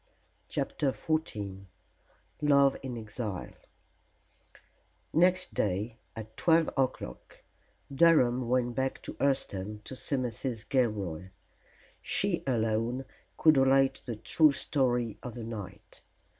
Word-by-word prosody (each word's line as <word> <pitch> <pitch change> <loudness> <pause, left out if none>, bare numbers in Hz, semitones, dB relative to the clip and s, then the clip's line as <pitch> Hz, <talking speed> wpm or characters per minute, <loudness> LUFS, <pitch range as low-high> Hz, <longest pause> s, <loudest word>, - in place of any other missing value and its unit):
CHAPTER 145 - -2
XIV 105 -13 -3 0.8
LOVE 140 -2 +5
IN 130 -3 -5
EXILE 110 -3 -5 1.6
Next 180 +3 +3
day 105 +4 -1 0.2
at 110 -1 -8
twelve 165 +3 +3
o'clock 130 - -3 0.5
Durham 130 -6 +4
went 125 -1 +1
back 130 +1 -2
to - - -6
Hurseton 105 -7 -1
to 130 - -5
see 140 - -1
Mrs. 120 -2 -3
Gilroy. 100 - -1 0.7
She - - 0
alone 115 +1 0 0.3
could 155 -3 +5
relate 135 0 +3
the 120 - -4
true 150 +8 +4
story 125 -5 0
of 125 -3 -7
the 120 - -6
night. 110 -4 -8
125 Hz, 105 wpm, -30 LUFS, 110-135 Hz, 1.6 s, LOVE